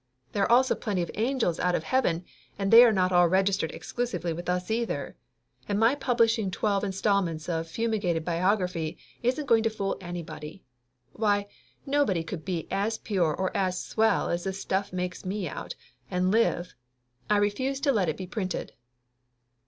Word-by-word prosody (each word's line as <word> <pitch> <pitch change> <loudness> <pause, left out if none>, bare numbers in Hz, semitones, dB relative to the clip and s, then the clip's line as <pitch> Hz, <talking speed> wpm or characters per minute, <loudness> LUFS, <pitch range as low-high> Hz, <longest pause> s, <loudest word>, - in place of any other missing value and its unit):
There 200 - -1
are 195 - +2
also 255 +2 +5
plenty 200 -6 -2
of 170 - -6
angels 230 -6 0
out 180 0 +2
of - - -1
heaven, 180 -6 +1 0.3
and 195 -1 -1
they 235 +1 +11
are 240 - +6
not 185 -3 +2
all 175 -1 +5
registered 190 -1 +1
exclusively 240 -9 -3
with 175 +2 -6
us, 180 +3 -1
either. 220 - -2 0.5
And 205 0 +1
my 225 +3 +5
publishing 230 -6 +2
twelve 200 +2 0
installments 190 -5 0
of 165 -2 -2
fumigated 195 -5 -1
biography 180 -2 0 0.2
isn't 255 +5 0
going 230 -4 +4
to 225 - +1
fool 200 -3 -3
anybody. 165 -1 -7 0.5
Why, 205 -2 +1 0.4
nobody 275 - +1
could 165 0 -6
be 175 -4 -3
as 215 +3 0
pure 175 -8 0
or 185 0 -2
as 185 -1 0
swell 220 0 +1
as 170 +1 -2
this 190 0 -3
stuff 200 +1 -1
makes 180 0 -4
me 190 0 -3
out, - - -6 0.3
and 185 +1 +1
live! 200 -5 +1 0.6
I 210 - +4
refuse 260 +7 0
to 280 - +3
let 200 -9 +1
it 155 - -2
be 185 - -5
printed." 185 -1 -4
195 Hz, 170 wpm, -27 LUFS, 175-225 Hz, 0.6 s, they